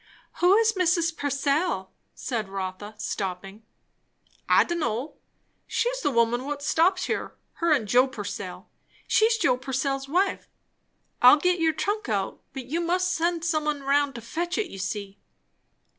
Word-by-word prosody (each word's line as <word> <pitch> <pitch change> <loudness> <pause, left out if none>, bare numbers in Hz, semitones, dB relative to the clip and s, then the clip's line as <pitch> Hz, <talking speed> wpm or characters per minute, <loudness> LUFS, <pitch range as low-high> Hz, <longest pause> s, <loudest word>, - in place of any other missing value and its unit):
"Who 360 +3 +5
is 450 0 +3
Mrs. 340 -3 +1
Purcell?" 280 - -1 0.2
said 225 -6 -3
Rotha 195 +2 -5
stopping. 195 0 -5 0.9
"I - - +6
d'n' 345 0 -3
know; 255 -1 -3 0.5
she's - - -1
the - - +1
woman 240 0 +1
what 285 0 -4
stops 365 +5 +2
here; - - -3 0.3
her 335 -1 +2
and 265 -8 +2
Joe 250 +5 +4
Purcell. 265 - -7 0.4
She's 450 +1 +3
Joe 255 - +2
Purcell's 270 +1 -2
wife. 375 +5 0 0.7
I'll 250 +4 +9
git 360 +3 +1
your 320 -1 +2
trunk 410 - -2
out, 200 -3 -2
but 265 -2 -7
you 320 +7 -2
must 365 +2 +1
send 335 -1 0
some 310 -3 0
un 290 -2 -1
roun' 285 +1 +2
to 235 - -8
fetch 345 +10 -3
it, 430 - -2
you 195 - -8
see." 200 +1 -5
285 Hz, 155 wpm, -26 LUFS, 235-345 Hz, 0.9 s, I'll